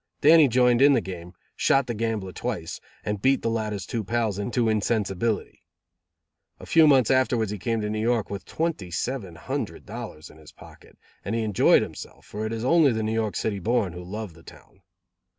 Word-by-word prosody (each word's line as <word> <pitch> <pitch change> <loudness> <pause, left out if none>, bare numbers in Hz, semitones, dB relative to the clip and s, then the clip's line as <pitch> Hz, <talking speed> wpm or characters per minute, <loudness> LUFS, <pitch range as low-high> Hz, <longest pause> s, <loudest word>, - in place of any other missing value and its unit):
Dannie 155 0 +7
joined 125 0 +3
in 140 +1 +7
the 130 - +4
game, 90 -1 -8 0.2
shot 135 0 +2
the 120 - -3
gambler 110 -4 -2
twice, - - -5 0.2
and 105 -1 -3
beat 135 +3 +2
the 115 - 0
latter's 105 -4 -3
two 115 +1 -3
pals 110 -2 -1
into 120 +3 0
insensibility. 110 -1 -1 1.0
A - - -10
few 160 -2 +5
months 135 -5 +4
afterwards 125 -5 +2
he 105 - -5
came 115 +4 -1
to 105 - -2
New 110 0 -2
York 115 -1 +1
with 100 -2 -6
twenty 155 - -3
seven 95 0 -4
hundred - - -5
dollars 75 +3 -8
in 75 - -17
his 75 - -15
pocket; - - -16 0.3
and 100 +4 -3
he 115 - 0
enjoyed 105 -3 +4
himself, - - -10
for 110 +1 -5
it - - -5
is 115 +1 -3
only 155 0 +5
the 110 -1 -2
New 110 +1 -1
York 110 -2 -1
City 105 -3 -2
born 105 -3 0
who 90 +1 -8
love 100 0 -6
the 85 - -17
town. 95 - -17
110 Hz, 200 wpm, -25 LUFS, 100-120 Hz, 1.0 s, Dannie